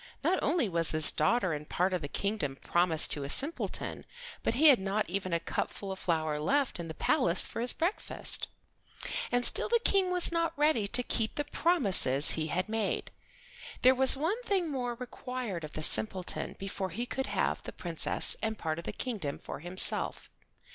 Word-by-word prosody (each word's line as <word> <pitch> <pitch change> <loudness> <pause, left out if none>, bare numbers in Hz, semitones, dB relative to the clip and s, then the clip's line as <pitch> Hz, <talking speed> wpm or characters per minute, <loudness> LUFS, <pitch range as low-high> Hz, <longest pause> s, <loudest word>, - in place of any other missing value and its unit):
Not 375 - +1
only 305 -5 0
was 170 -3 +2
his 155 -1 +8
daughter 185 +3 0
and 150 0 -8
part 185 +2 -1
of 180 - -2
the 145 - -5
kingdom 180 -5 -3
promised 170 +2 +3
to 145 - -4
a 140 - -7
simpleton, 290 - -1 0.4
but - - -2
he 305 +4 +5
had 265 - +5
not 200 +2 -3
even 185 0 -4
a 170 - 0
cupful 195 +3 -5
of 190 - -7
flour 155 -3 -2
left 275 - -1
in 170 - -6
the 160 - -9
palace 170 +1 +2
for - - -6
his 245 - +3
breakfast. 350 +6 +1 0.8
And 245 0 0
still - - +4
the 470 - +2
King 385 -2 +2
was 360 -1 +3
not 335 -1 -2
ready 295 -8 +1
to 250 +5 +2
keep 225 -2 -2
the 290 - -2
promises 200 - +3
he 155 -1 -3
had 180 +4 -3
made. 220 -2 -3 0.7
There 255 +1 +6
was 265 +1 +5
one 355 - -2
thing 380 -9 -2
more 245 -3 -4
required 250 -6 -7
of 150 - -9
the 155 - -4
simpleton 185 +1 0
before 195 -1 -5
he 225 +8 -5
could 265 +2 -5
have - - -2
the - - -9
Princess 170 -3 +2
and 220 0 -3
part 160 0 -4
of 170 - -10
the - - -4
kingdom 200 - -5
for - - -9
himself. 175 +3 +3
205 Hz, 190 wpm, -29 LUFS, 170-265 Hz, 0.8 s, his